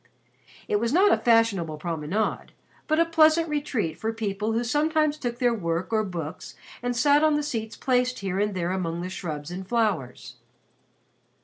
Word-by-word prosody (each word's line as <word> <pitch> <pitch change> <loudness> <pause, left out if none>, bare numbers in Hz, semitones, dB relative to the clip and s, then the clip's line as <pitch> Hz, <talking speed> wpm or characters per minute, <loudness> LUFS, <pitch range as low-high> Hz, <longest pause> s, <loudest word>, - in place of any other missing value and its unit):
It 210 - +1
was 230 +2 -1
not 380 +7 +5
a - - +4
fashionable 225 -10 +2
promenade 165 +5 -2 0.3
but 310 +1 +2
a 335 - +5
pleasant 325 0 +4
retreat 275 - -2
for 225 - -1
people 215 -1 -2
who 230 +2 0
sometimes 305 +4 +1
took 240 -5 -4
their 245 -2 +2
work 175 -1 -2
or 215 -1 +2
books 170 -4 -6 0.3
and 245 0 -2
sat 290 +4 +4
on 310 -1 +4
the 295 - 0
seats 225 -6 -4
placed 250 -1 +1
here 190 -1 -3
and 205 -1 0
there 175 -1 -1
among 170 -3 -2
the 180 +1 -5
shrubs 155 -4 -5
and 185 +1 -6
flowers. 205 - -2
220 Hz, 175 wpm, -25 LUFS, 180-275 Hz, 0.3 s, not